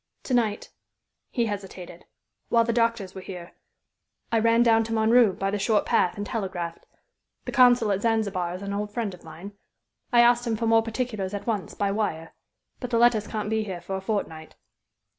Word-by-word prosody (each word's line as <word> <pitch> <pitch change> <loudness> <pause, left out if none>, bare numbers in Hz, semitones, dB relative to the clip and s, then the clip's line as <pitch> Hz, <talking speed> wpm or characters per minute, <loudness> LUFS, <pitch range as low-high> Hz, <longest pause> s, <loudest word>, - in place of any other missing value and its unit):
"To 260 - -3
night" 220 -4 0 0.6
he 240 -3 0
hesitated 190 -4 -7 0.4
"while 230 0 +4
the 235 0 -1
doctors 230 -5 0
were 190 - -8
here, 180 -2 -9 0.8
I 230 - +3
ran 230 +1 +4
down 225 -1 +4
to 225 - -4
Montreux 225 -1 +4
by 195 +1 -2
the 205 - -2
short 210 +1 +1
path 180 - +1
and 205 - -4
telegraphed. 185 -7 -5 0.6
The - - -4
consul 245 -4 +5
at 195 0 0
Zanzibar 200 -6 0
is 185 - -8
an 200 0 -4
old 205 +1 -3
friend 215 -3 -3
of 180 - -14
mine. 165 +5 -10 0.6
I 240 -1 +6
asked 240 0 +4
him 225 - 0
for 230 - -2
more 225 0 +4
particulars 220 -4 -3
at 200 - -6
once, 210 -7 -3
by 200 -1 0
wire. 180 -6 -3 0.5
But 250 - -5
the 235 - +1
letters 230 -3 +3
can't 215 -1 -4
be 220 0 +1
here 190 -4 -5
for 190 +3 -5
a 190 - -4
fortnight." 175 -6 -4
210 Hz, 195 wpm, -25 LUFS, 190-230 Hz, 0.8 s, I